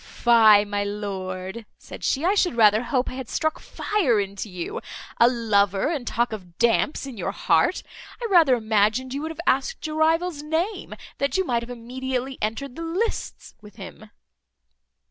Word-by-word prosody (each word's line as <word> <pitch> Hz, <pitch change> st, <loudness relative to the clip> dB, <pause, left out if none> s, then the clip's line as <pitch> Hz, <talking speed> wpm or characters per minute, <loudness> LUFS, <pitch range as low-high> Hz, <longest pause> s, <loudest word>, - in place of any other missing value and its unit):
"Fie, 220 Hz, -4 st, +5 dB
my 205 Hz, 0 st, -2 dB
lord," 200 Hz, 0 st, -5 dB
said -, -, -11 dB
she, 285 Hz, +4 st, 0 dB
"I 380 Hz, -, +3 dB
should 370 Hz, -9 st, +1 dB
rather 215 Hz, -1 st, +5 dB
hope 250 Hz, +1 st, -1 dB
I -, -, -5 dB
had 260 Hz, -2 st, -7 dB
struck 315 Hz, 0 st, -1 dB
fire 315 Hz, -, 0 dB
into 200 Hz, +1 st, -4 dB
you. 180 Hz, -2 st, -5 dB, 0.4 s
A 235 Hz, -, +7 dB
lover, 205 Hz, -3 st, +1 dB
and 285 Hz, -8 st, -3 dB
talk 240 Hz, +1 st, 0 dB
of 180 Hz, -5 st, -9 dB
damps 235 Hz, +5 st, +1 dB
in 265 Hz, -4 st, -8 dB
your 180 Hz, -, -2 dB
heart! -, -, +1 dB, 0.4 s
I 485 Hz, -, -4 dB
rather 335 Hz, -, +5 dB
imagined 220 Hz, +3 st, +1 dB
you 280 Hz, -, -3 dB
would 315 Hz, -, -4 dB
have 320 Hz, -, -9 dB
asked 275 Hz, -, 0 dB
your 310 Hz, 0 st, -4 dB
rival's 325 Hz, 0 st, +1 dB
name, 325 Hz, +7 st, -3 dB, 0.2 s
that 280 Hz, +6 st, 0 dB
you 380 Hz, -, +1 dB
might 235 Hz, -6 st, 0 dB
have 235 Hz, -, -9 dB
immediately 255 Hz, +2 st, -4 dB
entered 235 Hz, +5 st, -3 dB
the -, -, -7 dB
lists 355 Hz, +8 st, -3 dB
with 210 Hz, -1 st, -15 dB
him." 210 Hz, +1 st, -11 dB
240 Hz, 175 wpm, -24 LUFS, 210-305 Hz, 0.4 s, A